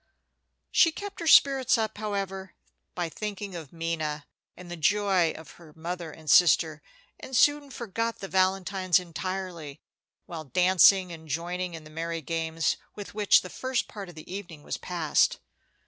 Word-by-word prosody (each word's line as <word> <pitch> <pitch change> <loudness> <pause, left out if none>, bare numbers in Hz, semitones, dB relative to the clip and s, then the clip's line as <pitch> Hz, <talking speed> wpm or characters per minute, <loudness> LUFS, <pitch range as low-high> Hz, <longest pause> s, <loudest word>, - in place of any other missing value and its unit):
She 330 - +5
kept 405 +4 -8
her 335 - -4
spirits 270 -5 +6
up, 220 -2 -2
however, 195 -3 -4 0.4
by 175 -1 -1
thinking 205 +2 -6
of 160 -5 -8
Minna, 160 -3 -3 0.3
and 175 -1 -11
the - - -4
joy 190 0 +2
of 160 - -11
her 155 -3 -15
mother 170 +1 -5
and 155 0 -14
sister, 160 0 +5 0.4
and 260 - -3
soon 290 +1 +3
forgot 230 -2 -3
the 195 - -7
valentines 190 -1 +2
entirely, 180 -3 -6 0.5
while 160 -2 -7
dancing 180 +4 +5
and 160 -1 -10
joining 175 +3 -3
in 160 - -9
the 155 - -14
merry 165 +1 -4
games 165 +1 -1 0.2
with 205 -1 -8
which 210 -1 +4
the 185 - -8
first 260 -1 -2
part 200 -3 -8
of 175 - -13
the 160 +3 -10
evening 175 -7 -8
was - - -4
passed. 170 -4 +1
180 Hz, 160 wpm, -27 LUFS, 165-200 Hz, 0.5 s, spirits